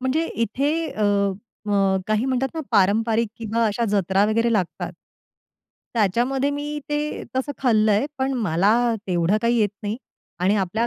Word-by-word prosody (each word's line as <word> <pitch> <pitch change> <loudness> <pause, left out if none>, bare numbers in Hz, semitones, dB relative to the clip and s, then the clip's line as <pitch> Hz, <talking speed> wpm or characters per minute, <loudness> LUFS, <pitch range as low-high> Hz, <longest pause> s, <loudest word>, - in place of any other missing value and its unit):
म्हणजे 260 +6 0
इथे 245 +6 0 0.2
अ, 215 - -3 0.6
अ, 205 - -1 0.3
काही 215 +3 +1
म्हणतात 265 0 0
ना, 320 - -2
पारंपरिक 220 +2 +3
किंवा 230 +1 0
अशा 225 +3 0
जत्रा 195 0 +2
वगैरे 230 +2 +1
लागतात. 180 -3 -2 1.0
त्याच्यामध्ये 240 +7 +1
मी 295 +1 -3
ते 295 0 -2
तसं 275 +2 -1
खाल्लंय. 220 -1 +3
पण 265 +1 0
मला 200 -5 +2 0.4
तेवढं 175 +2 +2
काही 235 0 +2
येत 210 -2 +3
नाही 210 +2 -2 0.4
आणि 190 +3 +3
आपल्या 205 +5 0
225 Hz, 145 wpm, -23 LUFS, 205-260 Hz, 1.0 s, पारंपरिक